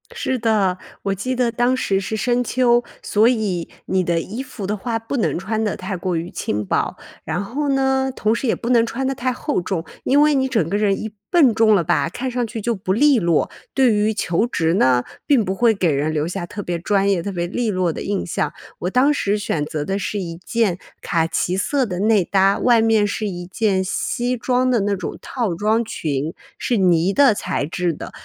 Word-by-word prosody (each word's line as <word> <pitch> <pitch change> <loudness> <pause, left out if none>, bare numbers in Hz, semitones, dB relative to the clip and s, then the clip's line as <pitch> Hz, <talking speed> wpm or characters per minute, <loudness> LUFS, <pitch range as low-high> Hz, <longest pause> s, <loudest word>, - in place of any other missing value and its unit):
是 260 -1 -1
的， 205 -5 +1 0.2
我 195 - 0
记 255 +7 -3
得 245 -2 +1
当 245 +2 +1
时 195 -6 +1
是 220 +3 -3
深 245 +3 +1
秋， 240 0 +2 0.2
所 215 +2 +3
以 210 -8 0 0.2
你 190 0 +1
的 170 -1 +1
衣 215 +9 -5
服 255 -6 -7
的 205 +2 -1
话 225 +3 -2
不 225 +5 -4
能 225 - 0
穿 215 +5 -2
得 210 -1 -1
太 190 0 -4
过 180 0 -2
于 165 +2 -3
轻 105 0 -3
薄， - - -1 0.3
然 170 +5 -2
后 280 +8 -2
呢， 265 -1 +1
同 215 +1 +1
时 250 - -2
也 - - +2
不 235 - -5
能 235 -2 +5
穿 250 +3 -3
得 270 - 0
太 255 0 -1
厚 270 - -2
重， 175 -2 -3 0.2
因 280 +3 +4
为 300 0 +4
你 265 -1 +2
整 225 -11 0
个 200 +4 0
人 205 -2 +1
一 220 - -5 0.2
笨 290 -9 +5
重 220 -1 +4
了 180 - +2
吧， 170 0 +1
看 255 +8 -4
上 245 -1 -1
去 225 +1 -6
就 235 +3 -1
不 190 -3 -3
利 275 +5 +4
落， 170 -4 +1 0.2
对 260 -4 +4
于 210 +1 +2
求 190 +3 0
职 165 -8 0
呢， 130 -8 +3 0.2
并 270 -8 +4
不 190 - -1
会 230 +2 +3
给 180 -4 +1
人 145 +2 0
留 155 0 -1
下 175 0 -4
特 205 +3 -6
别 175 -2 -3
专 200 +2 +1
业、 185 -3 +1
特 200 - -4
别 175 -2 -2
利 225 +6 -2
落 185 -4 0
的 - - -6
印 200 -1 -2
象。 150 -3 -1 0.3
我 180 - -2
当 260 +8 +3
时 205 -7 0
选 170 -7 -2
择 150 0 -4
的 195 +3 -1
是 205 - -3
一 170 -3 -5
件 210 -6 0 0.2
卡 165 -1 +1
其 175 +2 -1
色 265 +7 +1
的 180 -5 -4
内 210 -1 +3
搭， 195 +1 +3
外 240 -2 +4
面 220 -2 +3
是 210 +1 -2
一 175 -2 -5
件 190 +1 0
西 245 +6 -1
装 255 +1 +1
的 240 - +3
那 200 0 0
种 185 - -6
套 235 -8 -2
装 215 +6 +1
裙， 155 -6 -3 0.2
是 240 - 0
呢 180 -1 +3
的 275 -4 +5
材 - - -2
质 175 +1 -1
的， - - -8
210 Hz, 245 characters per minute, -20 LUFS, 180-240 Hz, 0.3 s, 能